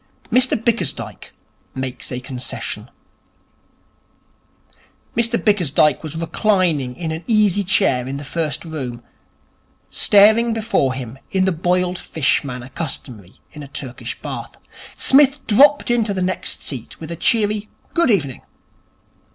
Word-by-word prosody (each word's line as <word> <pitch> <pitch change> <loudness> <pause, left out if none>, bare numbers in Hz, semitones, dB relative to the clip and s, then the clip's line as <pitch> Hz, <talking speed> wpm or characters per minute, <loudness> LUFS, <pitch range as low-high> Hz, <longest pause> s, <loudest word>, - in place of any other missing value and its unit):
Mr 255 +2 +4
Bickersdyke 235 +1 -2 0.4
Makes 130 -1 -4
a 125 - -3
Concession 125 -1 -5 2.3
Mr 235 0 +3
Bickersdyke 155 - +2
was 155 -1 -6
reclining 165 -6 +1
in 165 -2 -4
an 160 +2 -5
easy 210 -4 +3
chair 155 -9 +2
in 135 +1 -4
the 145 - -7
first 155 0 -3
room, 130 -7 -6 0.9
staring 220 +3 +5
before 210 -12 0
him 130 0 -7
in 190 -1 +1
the 190 - +2
boiled 180 +2 0
fish 150 -6 0
manner 125 -2 -7
customary 125 - -6 0.2
in 150 - -10
a 140 - -8
Turkish 130 -2 -6
Bath. - - -6 0.4
Psmith 275 +1 +4
dropped 275 +4 +5
into 225 -4 +1
the 185 - 0
next 185 +1 -3
seat 130 -6 -6
with 160 0 -8
a - - -3
cheery 210 +3 +1 0.2
'Good 335 -5 +3
evening.' 145 - 0
170 Hz, 125 wpm, -20 LUFS, 135-215 Hz, 2.3 s, staring